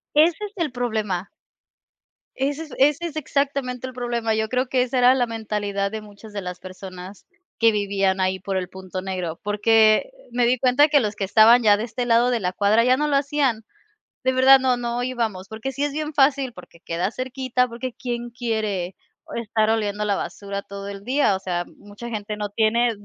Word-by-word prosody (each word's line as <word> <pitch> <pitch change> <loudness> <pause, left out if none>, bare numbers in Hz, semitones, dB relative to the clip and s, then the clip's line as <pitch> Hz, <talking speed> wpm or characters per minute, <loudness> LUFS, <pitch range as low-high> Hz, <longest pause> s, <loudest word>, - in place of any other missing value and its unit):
Ese 320 +3 +5
es 410 - -6
el 330 -7 -2
problema. 215 -7 -2 1.1
Ese 280 +3 -1
es 315 - -10
ese 295 +4 +3
es 320 -2 -7
exactamente 275 -4 -1
el 260 - -7
problema, 240 -2 -1
yo 220 0 0
creo 255 +2 0
que 255 -1 +2
esa 255 +1 -1
era 250 +1 +6
la 250 -2 +1
mentalidad 210 -3 -2
de 220 +1 -5
muchas 210 +1 -13
de 205 - -4
las 180 -1 -7
personas 185 +1 -10 0.3
que 230 -1 +5
vivían 195 -2 0
ahí 185 0 0
por 195 +1 -3
el 185 -1 -2
punto 185 0 -7
negro, 180 -4 -4
porque 215 - +3 0.2
me 240 0 +2
di 250 +2 +2
cuenta 260 +4 +4
que 295 -1 +4
los 210 -3 -2
que 205 - -3
estaban 225 +5 +6
ya 210 -2 +5
de 215 - -3
este 245 +1 -4
lado 240 +1 +4
de 240 -2 0
la 180 -2 -1
cuadra 210 +4 +3
ya 255 +1 +4
no 300 +2 0
lo 290 -2 +2
hacían, 275 -5 0 0.6
de 260 - +3
verdad 265 +1 +7
no 260 -1 +2
no 240 0 -3
íbamos, 230 -7 -2
porque 220 +6 -5
sí 280 +2 -1
es 290 - -3
bien 305 +1 -3
fácil, 275 -2 +3
porque 180 -5 -15
queda 170 +3 -2
cerquita, 255 0 -1
porque 240 +2 -5
quién 240 -1 -4
quiere, 215 -7 -2 0.3
oh, - - -12
estar 220 -1 0
oliendo 210 -2 0
la 205 -1 +1
basura 200 0 -5
todo 200 0 -8
el 200 0 -9
día, 260 -6 +2
o - - -4
sea, 175 -2 -2
mucha 205 +3 -10
gente 210 -2 -4
no 210 0 -4
tiene 225 +2 +2
230 Hz, 205 wpm, -23 LUFS, 200-255 Hz, 1.1 s, verdad